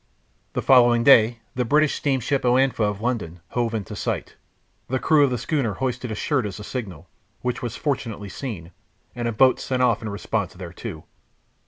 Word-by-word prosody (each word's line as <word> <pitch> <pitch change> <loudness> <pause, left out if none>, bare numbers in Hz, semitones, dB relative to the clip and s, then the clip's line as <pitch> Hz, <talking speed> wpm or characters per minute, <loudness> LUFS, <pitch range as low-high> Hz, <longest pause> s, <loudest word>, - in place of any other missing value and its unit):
The - - -2
following 120 -3 +5
day 115 -3 +6
the 125 - 0
British 150 +5 +3
steamship 135 0 0
Oanfa, 130 +1 +2
of 105 0 -2
London, 110 -8 -2
hove 120 -2 -1
in 105 -3 -3
sight. - - -4 0.5
The 130 - 0
crew 150 +2 +4
of 140 - +4
the 125 - -1
schooner 135 -6 -1
hoisted 125 -2 -3
a 110 - -3
shirt 130 0 0
as 100 - -7
a - - -7
signal, 95 - -6 0.4
which 125 -1 -2
was 120 -2 -4
fortunately 115 -8 -3
seen, 95 - -6 0.4
and 120 -1 -2
a - - 0
boat 130 +4 +4
sent 130 -1 -1
off 115 -3 +2
in 110 - -4
response 100 -2 -3
thereto. 85 -3 -8
120 Hz, 180 wpm, -23 LUFS, 105-130 Hz, 0.5 s, day